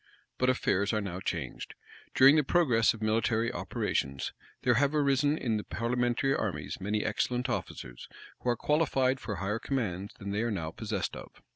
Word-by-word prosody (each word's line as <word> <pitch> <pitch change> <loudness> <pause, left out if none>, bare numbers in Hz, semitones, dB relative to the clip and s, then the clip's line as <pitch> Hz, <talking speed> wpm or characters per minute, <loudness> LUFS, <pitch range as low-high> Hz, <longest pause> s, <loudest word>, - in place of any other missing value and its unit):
But 125 - +3
affairs 100 -5 +1
are 110 - +2
now 95 -3 -4
changed. - - -4 0.4
During 135 +3 +8
the 155 - +4
progress 130 -9 +3
of 110 - -8
military 110 +1 +1
operations, 70 0 -2 0.3
there - - +4
have 145 +1 +2
arisen 145 +1 +2
in 115 -7 0
the 105 - -4
parliamentary 120 +3 0
armies - - -3
many 105 +2 -1
excellent 125 +4 0
officers, 60 - -5 0.3
who 125 - -2
are 120 - +1
qualified 135 -3 +2
for 105 -6 -4
higher 100 +5 -2
commands 105 -7 -3
than 100 -2 -5
they 105 +2 0
are 120 - 0
now 85 -7 -3
possessed - - -3
of. - - -12
115 Hz, 170 wpm, -30 LUFS, 105-130 Hz, 0.4 s, During